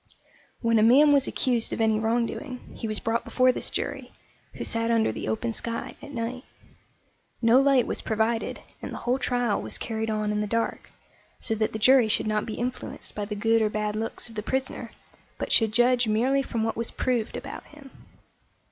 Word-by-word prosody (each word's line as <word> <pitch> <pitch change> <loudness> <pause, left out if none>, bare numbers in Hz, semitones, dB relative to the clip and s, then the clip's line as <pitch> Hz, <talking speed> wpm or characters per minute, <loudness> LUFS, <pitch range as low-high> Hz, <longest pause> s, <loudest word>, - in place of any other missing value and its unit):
When 230 -1 +3
a - - +4
man 280 +7 +6
was 275 -2 +4
accused 240 -3 0
of - - -3
any 220 -1 +3
wrongdoing, 235 +3 -2
he 225 - -4
was 215 -1 -2
brought 225 +1 -1
before 255 0 +3
this - - -3
jury, - - -4 0.4
who - - -5
sat 230 0 0
under 230 -1 +3
the - - -5
open 230 +1 -1
sky 230 +1 -4
at 285 - -10
night. 245 +1 -4 1.0
No 235 +3 +5
light 275 -3 +4
was - - -3
provided, 225 +1 -1 0.2
and - - -6
the - - -5
whole 250 +2 0
trial 245 -5 0
was - - -3
carried 220 -1 -3
on 215 -1 -1
in 210 0 0
the 210 - -2
dark, 230 +2 -2 0.5
so 225 - 0
that 215 0 0
the - - -4
jury 255 +1 +6
should 215 - +2
not 215 0 0
be 220 - -4
influenced 245 +1 -5
by 205 - -3
the 210 +1 -5
good 225 +2 +2
or 215 - +2
bad 210 0 -2
looks 225 +2 -4
of 230 - -13
the 215 - -3
prisoner, 265 +4 -3 0.5
but - - -4
should 220 -2 +5
judge 245 +1 +3
merely 250 +6 +2
from 235 -4 -2
what 225 - -1
was 230 0 -2
proved 245 -2 -1
about 275 +2 -7
him. 285 -3 -15
230 Hz, 200 wpm, -26 LUFS, 220-250 Hz, 1.0 s, man